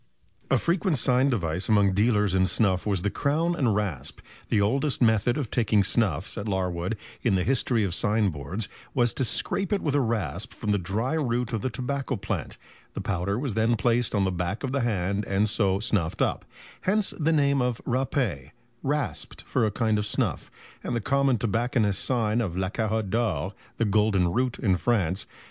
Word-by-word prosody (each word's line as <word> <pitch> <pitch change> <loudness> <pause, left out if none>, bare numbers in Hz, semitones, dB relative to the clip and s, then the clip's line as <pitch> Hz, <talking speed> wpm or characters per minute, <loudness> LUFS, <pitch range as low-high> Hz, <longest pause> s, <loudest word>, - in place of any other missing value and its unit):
A - - +4
frequent 170 -1 +1
sign 125 +2 +3
device 90 -6 -1
among 100 -3 +4
dealers 105 -1 +2
in 95 0 +3
snuff 95 0 +1
was 95 -4 0
the 100 - 0
Crown 160 +4 +1
and 120 -10 +1
Rasp. 95 -11 -3 0.3
The 105 - +3
oldest 135 +8 +1
method 115 +1 +3
of 140 -7 -3
taking 110 -4 +3
snuff, 95 -7 +1
says 100 - -5
Larwood, 95 +1 -1 0.2
in 115 -6 +2
the 90 - +1
"History 120 -2 +1
of 95 -4 -1
Signboards," 95 -2 0 0.3
was 120 -2 +3
"to - - -1
scrape 175 - -1
it 205 - 0
with 145 - 0
a 145 - +3
rasp 115 -5 -2
from 105 - -2
the 100 - +2
dry 105 - -1
root 125 -6 -1
of 110 - -1
the 130 - -1
tobacco 135 +2 -3
plant; 105 -1 -4 0.4
the - - -3
powder 100 +1 -1
was 130 -2 -2
then 110 +2 +2
placed 120 +1 +1
on 100 - +2
the 95 - +1
back 90 +6 -3
of 135 - -2
the 140 0 0
hand 100 -3 0
and 100 +2 +2
so 100 -3 +1
snuffed 100 -7 0
up; - - -1 0.4
hence 205 +2 +1
the 160 +1 +2
name 140 -3 +3
of 125 -2 0
râpé 120 - -1 0.3
(rasped) 145 -2 -2
for 115 -4 +1
a - - -1
kind 110 -1 +1
of 105 - -2
snuff, - - -1 0.3
and 120 - -2
the - - +1
common 135 +3 +2
tobacconist's 115 -2 0
sign 115 -2 +1
of 90 -6 -3
La 95 0 0
Carotte 110 -2 -1
d'or 95 -6 0 0.2
(the 115 - +1
golden 100 -4 +2
root) 125 +2 0
in 95 -6 +1
France." 95 -4 0
110 Hz, 190 wpm, -26 LUFS, 100-125 Hz, 0.4 s, A